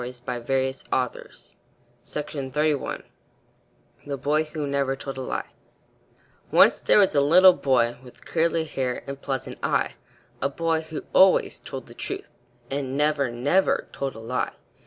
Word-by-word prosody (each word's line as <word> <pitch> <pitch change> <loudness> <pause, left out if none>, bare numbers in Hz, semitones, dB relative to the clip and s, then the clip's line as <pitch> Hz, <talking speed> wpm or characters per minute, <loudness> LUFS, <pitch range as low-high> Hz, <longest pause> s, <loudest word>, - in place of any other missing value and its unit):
HENRY 125 +1 -2 0.2
WADSWORTH 125 -2 -3 0.5
LONGFELLOW 150 0 -2 1.0
THE 140 -1 -3
BOY 150 +4 +1
WHO 155 -1 -4
NEVER 140 -1 0
TOLD 135 0 -7
A - - -4
LIE 130 - -3 1.1
Once - - +6
there - - +4
was 200 -2 +5
a 140 - +4
little 180 +6 +7
boy, 120 -6 +1
With 125 -1 -16
curly 165 0 +1
hair 130 -5 -3
and 140 0 -7
pleasant 135 -2 -4
eye - - 0 0.5
A 140 - +1
boy 165 +2 0
who 160 -1 -7
always 190 0 +5
told - - -7
the - - -13
truth, - - -6 0.4
And 135 -1 -2
never, 150 -3 +2
never 140 +11 +1
told 135 -3 -4
a - - -9
lie. 115 +3 -2
140 Hz, 140 wpm, -25 LUFS, 130-155 Hz, 1.1 s, little